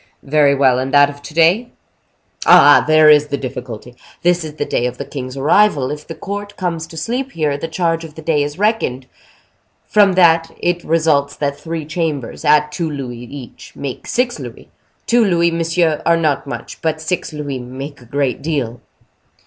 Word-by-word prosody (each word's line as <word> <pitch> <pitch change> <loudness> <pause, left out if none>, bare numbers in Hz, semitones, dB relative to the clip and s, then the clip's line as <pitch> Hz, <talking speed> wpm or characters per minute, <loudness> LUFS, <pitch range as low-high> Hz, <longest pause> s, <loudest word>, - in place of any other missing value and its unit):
"Very 145 0 +3
well; 130 -2 +3
and 130 +1 -3
that 145 0 +6
of 145 0 -15
to 145 - -10
day?" 180 +9 +3 0.8
"Ah! - - +7
there 155 0 +5
is 150 -1 +6
the 140 -1 -2
difficulty. 125 -3 -7 0.3
This 175 0 +2
is 155 -1 -8
the 145 - -2
day 120 - 0
of 125 0 -6
the 140 - -5
king's 130 -1 -7
arrival; 145 -1 +3
if 150 0 -7
the 165 - -7
court 205 +4 -6
comes 170 -3 -3
to 165 - -12
sleep 250 +10 -3
here, 150 -3 0
the 145 +3 -4
charge 165 0 -1
of 155 -2 -11
the 160 - -10
day 155 -2 +1
is 145 +2 -3
reckoned. 205 - 0 0.8
From 205 -2 +4
that 165 -2 +4
it 175 0 -1
results 155 -3 +1
that 140 -1 -2
three 165 -2 -5
chambers, 155 -5 -3
at 150 0 +3
two 165 +1 -3
louis 130 -5 -6
each, 130 -1 -11
make 135 -3 -6
six 245 -1 -1
louis. - - -10 0.4
Two 235 0 +3
louis, 170 -4 +2
monsieur, 165 -1 0
are 170 0 +3
not 150 -3 0
much; 140 - -7
but 160 -1 -1
six 160 +3 -3
louis 145 -3 -5
make 130 +3 -8
a - - -15
great 140 +1 -2
deal." 135 -7 -3
155 Hz, 190 wpm, -17 LUFS, 140-170 Hz, 0.8 s, Ah